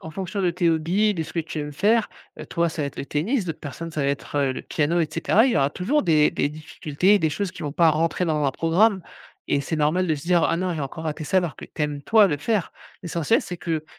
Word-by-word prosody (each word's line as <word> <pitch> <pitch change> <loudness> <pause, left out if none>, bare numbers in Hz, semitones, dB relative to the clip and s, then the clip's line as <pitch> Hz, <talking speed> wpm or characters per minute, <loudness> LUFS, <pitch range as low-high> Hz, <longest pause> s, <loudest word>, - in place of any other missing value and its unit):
En 160 - -8
fonction 190 +4 -4
de 180 - +2
tes 170 0 +1
hobbies, 175 +7 +2
de 165 - -2
ce 160 0 -9
que - - -3
tu 160 -1 -3
aimes 150 0 -5
faire, 215 +9 +2 0.3
heu, - - -7
toi 170 0 0
ça 160 -1 -4
va 140 - -1
être 140 - -8
le - - -4
tennis, 190 - 0
d'autres 160 -3 -4
personnes 160 +4 -7
ça 155 - -3
va - - 0
être, 140 +1 -4
heu, 140 -2 +2
le - - -6
piano 165 +3 0
et 160 - 0
cetera. 210 +8 +3
Il 260 - +1
y - - +1
aura 140 -1 +2
toujours 260 - 0
des 155 -5 +4
des - - 0
difficultés 155 +4 0
et - - +4
des 160 -4 +1
choses 200 +4 -2
qui 170 - -9
vont 145 - -3
pas 165 +2 +4
rentrer 165 +3 0
dans 155 -2 0
un 140 - +2
programme 185 - +2 0.5
et 140 - +2
c'est 160 - -3
normal 155 +5 +1
de 160 - +1
se 140 - -8
dire: 175 0 +2
«Ah 165 - +1
non, 180 +1 -1
j'ai 155 - -4
encore 145 +4 -5
raté 155 0 -3
ça», 190 - 0
alors 175 -5 -2
que - - -9
tu - - -6
aimes 145 -1 -2
toi 215 +5 +5
le 150 -6 0
faire. 205 +6 -1 0.3
L'essentiel 170 +5 +1
c'est 180 - -6
que 165 -2 -3
165 Hz, 285 wpm, -23 LUFS, 150-185 Hz, 0.5 s, toi